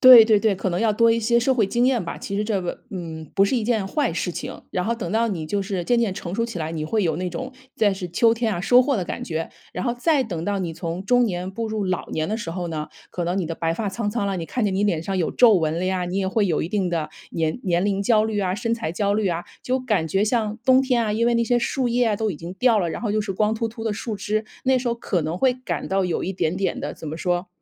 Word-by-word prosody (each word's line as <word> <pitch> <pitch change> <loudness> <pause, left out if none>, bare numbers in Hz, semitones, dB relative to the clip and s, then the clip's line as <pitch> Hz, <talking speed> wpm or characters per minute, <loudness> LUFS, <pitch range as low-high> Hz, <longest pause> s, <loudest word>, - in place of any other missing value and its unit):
对 250 -3 +11
对 215 -2 +4
对， 215 -3 +2
可 190 - -1
能 175 - -1
要 220 -2 +2
多 230 +2 +5
一 230 0 +2
些 235 +2 +3
社 250 +3 +2
会 225 -5 +2
经 240 +5 +1
验 255 -3 +2
吧， 170 - -5
其 200 - -6
实 205 - +1
这 210 -3 -1
个 175 - -5
嗯， 160 -4 -6
不 195 - +5
是 200 - 0
一 240 - +1
件 215 -3 0
坏 290 +8 0
事 175 +1 -2
情， - - -6
然 180 - -1
后 230 +5 0
等 215 -7 -5
到 230 +1 +2
你 175 -7 -3
就 200 +6 -1
是 190 -3 -3
渐 240 +5 +2
渐 215 -5 0
成 175 -1 -5
熟 230 +2 0
起 230 -6 -6
来， 160 0 -3
你 155 -2 -3
会 215 +6 +1
有 160 -4 +1
那 180 +1 -2
种 255 +7 -5 0.2
在 210 -2 +3
是 190 -2 -5
秋 225 +7 +4
天 230 -1 0
啊， 175 - -3
收 245 +4 +6
获 265 +1 +1
的 185 - -1
感 - - -5
觉。 165 0 -3 0.2
然 180 - -3
后 240 - +1
再 275 +4 +2
等 180 -9 -4
到 205 -1 0
你 175 -3 -3
从 170 +3 -5
中 245 +3 +4
年 180 -2 -3
步 225 +3 -4
入 215 -2 -2
老 185 -1 -2
年 155 0 -1
的 215 +5 -2
时 170 - -5
候 175 +1 -3
呢， 155 -2 -4 0.2
可 175 - -3
能 175 +2 -1
你 190 - 0
的 165 +1 -3
白 165 0 -1
发 210 +1 -2
苍 205 +2 -2
苍 205 -2 -1
了， 195 -2 -1
你 165 - -4
看 245 +5 -1
见 200 -2 +1
你 200 +2 +1
脸 175 -6 +1
上 190 +2 -2
有 170 - 0
皱 240 -3 +6
纹 165 -4 +1
了 180 - -1
呀， 185 -1 0
你 180 +2 -3
也 195 -1 0
会 205 +2 +1
有 165 -5 +1
一 160 - -3
定 195 -3 0
的 165 -3 -2 0.2
年 160 +6 -1
年 175 -1 +1
龄 200 -1 0
焦 215 +1 +4
虑 220 -1 -1
啊、 185 -1 0
身 230 +3 -2
材 230 -7 -2
焦 200 +4 0
虑 205 -1 +1
啊。 170 0 -2 0.2
就 255 +1 0
感 210 -10 0
觉 195 +5 +2
像 215 -1 0
冬 260 0 +6
天 250 -3 +1
啊， 210 - 0
因 230 +2 +1
为 240 - +3
那 235 0 +2
些 240 +1 +2
树 245 +1 0
叶 240 +1 +2
啊， 210 - +1
都 220 0 0
已 170 - -5
经 170 +4 -8
掉 230 +2 +3
了， 175 -4 0
然 160 - -5
后 220 - 0
又 215 +1 +1
是 200 -2 -3
光 210 +3 +1
秃 225 +1 -1
秃 225 0 -8
的 220 - 0
树 215 +1 -4
枝， 215 +2 -2 0.2
那 260 0 +4
时 245 0 -2
候 235 - +1
可 205 -6 -1
能 160 +2 -2
会 255 +6 +3
感 255 +1 -4
到 190 -1 +1
有 175 - -1
一 190 - -2
点 175 -2 -1
点 195 0 -1
的， - - -4
怎 - - -9
么 155 +2 -5
说？ 175 +1 -1
200 Hz, 335 characters per minute, -23 LUFS, 175-230 Hz, 0.2 s, 对